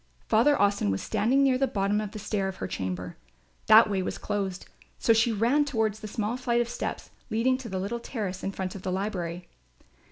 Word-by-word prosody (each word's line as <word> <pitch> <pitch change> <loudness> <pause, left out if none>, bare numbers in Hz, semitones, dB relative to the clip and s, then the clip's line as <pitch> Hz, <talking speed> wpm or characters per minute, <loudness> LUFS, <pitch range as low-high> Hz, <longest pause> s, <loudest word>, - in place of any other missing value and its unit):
Father 235 +7 +4
Austin 200 - +2
was 95 0 0
still - - -3
standing 260 +6 +3
near 260 -2 +3
the 270 - +2
bottom 200 0 0
of 210 - -4
the 215 - -9
stair 205 -2 -2
to - - -16
her 95 - -4
chamber. 90 -1 -4 0.5
That 220 +1 +8
way 195 -2 0
was 185 - -3
closed; 195 -3 -3 0.3
so 230 - +4
she 225 +1 +3
ran 235 +7 +3
toward 220 -7 0
the 215 +1 -9
small 215 +3 -2
flight 240 -2 0
of 240 0 0
steps - - -5 0.2
leading 235 +3 +2
to 245 -3 -7
the 190 - -3
little 200 +6 -3
terrace 205 -6 -5
in 195 - -1
front 190 -1 -4
of 195 - -8
the 185 - -3
library. 180 -3 -3
210 Hz, 220 wpm, -27 LUFS, 190-235 Hz, 0.5 s, That